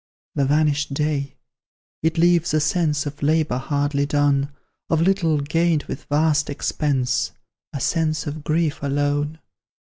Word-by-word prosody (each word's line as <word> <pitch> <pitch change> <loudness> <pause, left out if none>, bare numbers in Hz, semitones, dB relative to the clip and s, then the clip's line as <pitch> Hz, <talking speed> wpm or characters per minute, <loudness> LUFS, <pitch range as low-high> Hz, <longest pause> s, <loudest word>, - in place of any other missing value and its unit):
"The 140 - +1
vanished 145 -1 +1
day? 145 -2 -1 0.7
It 160 +1 0
leaves 175 -1 +3
a - - +4
sense 150 -1 +1
Of 145 0 -6
labour 150 -3 +1
hardly 145 +1 0
done; 145 -1 +1 0.4
Of 165 - +2
little 165 -3 +2
gained 160 +1 +1
with - - -7
vast 150 0 +2
expense 135 -3 -1 0.4
A 140 - -4
sense 155 +2 0
of 150 0 -5
grief 155 0 0
alone? 145 +2 0
150 Hz, 130 wpm, -22 LUFS, 145-160 Hz, 0.7 s, a